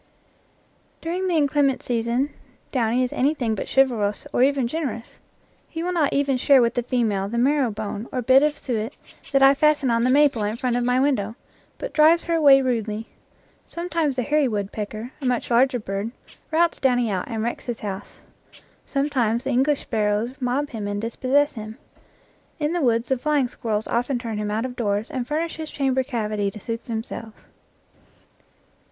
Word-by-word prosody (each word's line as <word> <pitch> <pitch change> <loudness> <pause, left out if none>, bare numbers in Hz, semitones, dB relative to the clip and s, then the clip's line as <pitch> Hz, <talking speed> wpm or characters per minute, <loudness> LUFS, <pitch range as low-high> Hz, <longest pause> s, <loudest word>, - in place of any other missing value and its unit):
During 360 +3 -2
the 355 - +1
inclement 285 -2 +2
season 240 +4 0 0.4
Downy 245 -1 +1
is 250 - -2
anything 260 -4 +1
but 210 - -4
chivalrous 230 -7 +1
or - - +2
even 270 -2 +3
generous. 255 -5 -5 0.5
He 325 0 -5
will 360 - -1
not 315 -5 +2
even 280 -2 +1
share 275 +2 +5
with 235 -1 +2
the 245 - 0
female 220 -6 0
the 235 - -3
marrow 270 +1 +2
bone 215 +1 -5
or 250 -2 -2
bit 260 +3 +6
of 300 0 +1
suet 225 -3 -3 0.4
that 275 -1 +4
I 270 0 +8
fasten 285 -3 +2
on 230 0 +2
the 250 - +2
maple 280 -3 +4
in 210 +2 -1
front 245 0 -1
of 245 - +1
my 250 +1 +2
win 280 +2 +3
dow, 220 -1 -3 0.4
but - - -6
drives 315 +2 +5
her 335 - -2
away 280 -4 +6
rudely. 225 -3 -2 0.6
Sometimes 335 -5 -1
the 250 - -1
hairy 295 +2 +2
woodpecker, 215 +2 -4
a - - -5
much 250 -1 -1
larger 250 +2 +4
bird, 200 -1 -4 0.4
routs 335 +1 +2
Downy 245 -4 +2
out 185 -2 -2
and 225 -2 -3
wrecks 235 +2 -4
his 240 -2 -4
house. 195 -2 -7 0.7
Sometimes 260 -5 0
the 270 - -2
English 270 +3 +2
sparrows 215 +1 0
mob 260 +4 -1
him 215 -4 -4
and 205 0 -2
dispossess 265 +6 +1
him. 215 -1 -8 0.8
In 300 +1 -1
the 350 - 0
woods 235 -3 +1
the 265 -2 +1
flying 290 -1 +1
squirrels 220 -3 -3
often 245 +3 0
turn 230 -3 -4
him 210 0 -2
out 220 +3 -1
of 250 -1 -6
doors 210 +1 -1
and 255 -4 -3
furnish 320 +4 -2
his 315 -1 -6
chamber 265 -2 0
cavity 215 -6 -2
to 215 - -10
suit 230 +3 -5
themselves. 225 -2 -6
250 Hz, 185 wpm, -23 LUFS, 225-280 Hz, 0.8 s, I